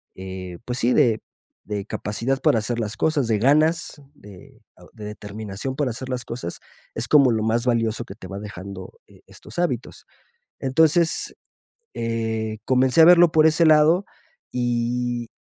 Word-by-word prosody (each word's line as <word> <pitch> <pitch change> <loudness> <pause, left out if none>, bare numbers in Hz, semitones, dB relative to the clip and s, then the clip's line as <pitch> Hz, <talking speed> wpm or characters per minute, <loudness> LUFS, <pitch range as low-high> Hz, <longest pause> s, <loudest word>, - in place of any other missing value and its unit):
eh, 95 -1 -7
pues 125 0 -3
sí, 120 +2 +2
de 115 -4 +3 0.4
de 100 -1 -4
capacidad 115 +5 -2
para 115 - +3
hacer 120 +2 -3
las 110 -1 -3
cosas, 155 -6 +1
de 110 -2 +1
ganas, 155 +5 +2
de 100 -8 -15 0.3
de 105 - -11
determinación 105 +3 -6
para 135 -3 -1
hacer 130 +3 -7
las 125 -1 -3
cosas, 115 -7 -6 0.4
es - - -3
como 140 -4 +5
lo 110 -1 0
más 115 +2 0
valioso 115 -1 0
que 95 - -10
te 95 - -11
va 100 +1 -7
dejando, 100 -2 -9
eh, - - -20
estos - - -10
hábitos. 135 -9 -3 0.5
Entonces, 160 +5 +2 0.6
eh, 110 -1 -3
comencé 130 +3 +3
a - - +9
verlo 175 -1 +7
por 155 0 +5
ese 160 +1 +4
lado 155 +4 +5 0.5
y 120 -1 -2
120 Hz, 155 wpm, -23 LUFS, 110-140 Hz, 0.6 s, a